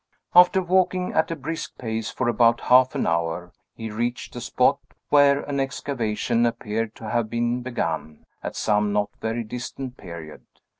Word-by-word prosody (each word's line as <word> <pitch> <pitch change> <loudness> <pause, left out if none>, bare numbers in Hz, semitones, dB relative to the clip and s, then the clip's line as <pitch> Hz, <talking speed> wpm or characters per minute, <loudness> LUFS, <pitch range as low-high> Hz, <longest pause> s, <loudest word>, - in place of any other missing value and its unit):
After 180 +1 +7
walking 185 0 +1
at 160 - +2
a 165 - -2
brisk 165 0 -5
pace 110 -2 -3
for 130 - -2
about 115 0 +4
half 130 +1 +5
an - - 0
hour, 85 +1 -1 0.2
he 115 -1 -6
reached 120 +3 -3
a - - -5
spot - - +2 0.3
where 145 -1 +5
an 140 -1 -3
excavation 120 -4 -1
appeared 115 -2 -1
to 110 - -8
have 120 -2 0
been 120 +1 0
begun, 80 -11 -3 0.2
at - - -5
some 105 -1 +1
not 105 0 0
very 115 +1 -2
distant 125 +3 -6
period. 85 -4 -9
120 Hz, 160 wpm, -24 LUFS, 105-135 Hz, 0.3 s, After